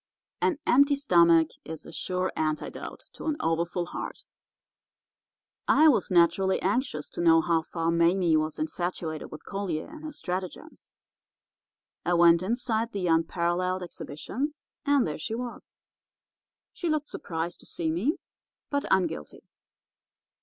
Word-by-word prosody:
An 330 Hz, -, +2 dB
empty 280 Hz, +3 st, +5 dB
stomach 170 Hz, -, +5 dB
is 160 Hz, 0 st, -7 dB
a -, -, -10 dB
sure 185 Hz, +2 st, -2 dB
antidote 155 Hz, -1 st, -3 dB
to -, -, -9 dB
an 305 Hz, -1 st, 0 dB
overfull 170 Hz, +2 st, 0 dB
heart. -, -, -7 dB, 1.4 s
"I 310 Hz, +2 st, +6 dB
was 280 Hz, -, +2 dB
naturally 180 Hz, +2 st, +3 dB
anxious 190 Hz, -, -1 dB
to -, -, -5 dB
know 165 Hz, -1 st, +6 dB
how 165 Hz, 0 st, +2 dB
far 165 Hz, +1 st, -2 dB
Mame 170 Hz, -1 st, +3 dB
was 155 Hz, 0 st, -3 dB
infatuated 175 Hz, -, -3 dB
with 155 Hz, -, -10 dB
Collier 195 Hz, -6 st, -3 dB
and 315 Hz, +1 st, -11 dB
his 305 Hz, -1 st, -7 dB
stratagems. 185 Hz, -, -6 dB, 1.1 s
I 175 Hz, 0 st, +2 dB
went 170 Hz, 0 st, +6 dB
inside 230 Hz, +2 st, -1 dB
the 195 Hz, -3 st, -2 dB
Unparalleled 175 Hz, +2 st, +1 dB
Exhibition, 180 Hz, -, -5 dB, 0.3 s
and 285 Hz, -2 st, +4 dB
there 155 Hz, -1 st, -4 dB
she 220 Hz, +8 st, -3 dB
was. 245 Hz, 0 st, -7 dB, 1.0 s
She 350 Hz, -3 st, -3 dB
looked 305 Hz, -1 st, -1 dB
surprised 165 Hz, 0 st, -4 dB
to -, -, -11 dB
see 160 Hz, -2 st, -1 dB
me, 220 Hz, -, +1 dB, 0.6 s
but 285 Hz, 0 st, 0 dB
unguilty. 180 Hz, -, 0 dB
180 Hz, 130 wpm, -28 LUFS, 165-240 Hz, 1.4 s, I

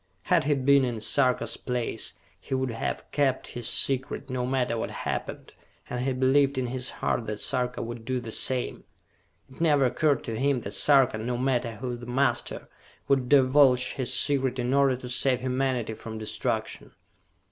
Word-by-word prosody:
Had -, -, +2 dB
he 145 Hz, 0 st, +2 dB
been 140 Hz, +1 st, +4 dB
in 120 Hz, -3 st, -2 dB
Sarka's 120 Hz, 0 st, +2 dB
place, 125 Hz, -2 st, -3 dB, 0.2 s
he 135 Hz, -, -4 dB
would 130 Hz, -1 st, -1 dB
have 115 Hz, -, -4 dB
kept 135 Hz, -3 st, 0 dB
his 120 Hz, -2 st, -1 dB
secret, 135 Hz, 0 st, -1 dB
no 125 Hz, -1 st, -2 dB
matter 130 Hz, -2 st, 0 dB
what 115 Hz, -, -3 dB
happened, -, -, -5 dB, 0.4 s
and 125 Hz, 0 st, -2 dB
he 135 Hz, -, 0 dB
believed 135 Hz, +2 st, +2 dB
in 130 Hz, -, 0 dB
his 125 Hz, +1 st, -3 dB
heart 115 Hz, -, -2 dB
that 105 Hz, 0 st, -3 dB
Sarka 125 Hz, +3 st, -1 dB
would 120 Hz, 0 st, -7 dB
do 130 Hz, +2 st, -2 dB
the 115 Hz, -2 st, -7 dB
same. 125 Hz, +2 st, -1 dB, 0.6 s
It 130 Hz, -, -13 dB
never 145 Hz, -5 st, +4 dB
occurred 135 Hz, +2 st, +1 dB
to 115 Hz, -1 st, -4 dB
him 135 Hz, -2 st, +1 dB
that 100 Hz, -, -6 dB
Sarka, 135 Hz, -5 st, +4 dB
no 120 Hz, +2 st, -2 dB
matter 125 Hz, -2 st, 0 dB
who 125 Hz, +2 st, -4 dB
the 120 Hz, 0 st, -10 dB
master, 125 Hz, -1 st, -1 dB, 0.4 s
would 130 Hz, -3 st, +1 dB
divulge 130 Hz, -2 st, +4 dB
his 130 Hz, -3 st, -3 dB
secret 130 Hz, 0 st, +1 dB
in 125 Hz, +1 st, -1 dB
order 140 Hz, -2 st, +4 dB
to 125 Hz, 0 st, -8 dB
save 130 Hz, +1 st, +1 dB
humanity 130 Hz, -3 st, -1 dB
from 110 Hz, 0 st, -8 dB
destruction. 110 Hz, -1 st, -3 dB
130 Hz, 175 wpm, -27 LUFS, 120-135 Hz, 0.6 s, been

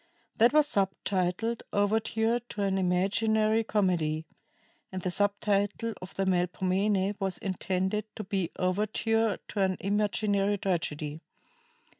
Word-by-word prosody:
That 235 Hz, +2 st, +6 dB
was 305 Hz, 0 st, +5 dB
subtitled 195 Hz, -1 st, -1 dB
"Overture 220 Hz, +3 st, +1 dB
to 235 Hz, -4 st, -5 dB
an 195 Hz, -1 st, +1 dB
Imaginary 215 Hz, +4 st, +2 dB
Comedy," 170 Hz, -7 st, 0 dB, 0.7 s
and 185 Hz, -, -4 dB
the 180 Hz, -, 0 dB
sub 205 Hz, +2 st, +1 dB
title 205 Hz, +2 st, 0 dB
of 185 Hz, -, -9 dB
the 195 Hz, -, 0 dB
"Melpomene" 190 Hz, +2 st, +1 dB
was 190 Hz, -2 st, -1 dB
intended 190 Hz, +2 st, -1 dB
to 215 Hz, -, -5 dB
be 190 Hz, -3 st, -1 dB
"Overture 215 Hz, +3 st, +1 dB
to 205 Hz, -, -2 dB
an 190 Hz, -1 st, +1 dB
Imaginary 205 Hz, 0 st, +1 dB
Tragedy." 160 Hz, -5 st, -2 dB
200 Hz, 120 wpm, -29 LUFS, 185-215 Hz, 0.7 s, That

